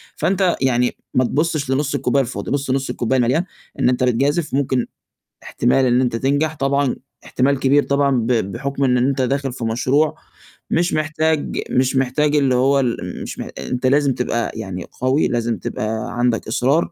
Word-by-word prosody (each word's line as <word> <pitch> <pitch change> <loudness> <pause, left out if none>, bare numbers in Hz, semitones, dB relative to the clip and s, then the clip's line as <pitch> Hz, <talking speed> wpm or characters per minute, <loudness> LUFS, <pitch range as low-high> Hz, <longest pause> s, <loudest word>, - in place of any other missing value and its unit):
فأنت 190 -2 +1
يعني 125 -2 +1 0.2
ما 130 - +3
تبُصش 150 0 -1
لنُص 140 +2 0
الكوباية 140 0 +1
الفاضي 125 - -5
بُص 140 -1 -1
نُص 135 0 -1
الكوباية 130 +2 0
المَليان، 125 +8 +2 0.4
إن - - +3
أنت 125 0 0
بتجازِف 140 +6 +1
ممكن 130 -3 +1 0.6
إحتمال 130 +2 +1
إن 125 0 +3
أنت 125 -3 0
تنجح 145 +6 0
طبعًا 140 -1 0 0.3
إحتمال 135 +1 +1
كبير 140 +2 +3
طبعًا 140 0 +1
ب 115 -1 -1
بحُكم 125 +5 -1
إن 125 -2 +3
أنت 135 +2 +1
داخِل 135 0 -1
في 120 - -5
مشروع 130 +7 +1 0.5
مش 175 +1 +1
محتاج 155 0 0
مش 130 +1 +2
محتاج 145 +3 +1
اللي 135 -3 +3
هو 135 +3 +3
ال 125 -3 0 0.2
م - - -5
مش - - -7
مح - - -5
أنت 125 +1 -3
لازم 140 0 +3
تبقى 120 -1 -2
يعني 95 -5 -5 0.2
قَوي، 130 +4 +2
لازم 120 -1 -1
تبقى 110 +2 -4
عندك 120 -2 +1
إصرار 135 +8 +1
130 Hz, 175 wpm, -20 LUFS, 125-140 Hz, 0.6 s, ما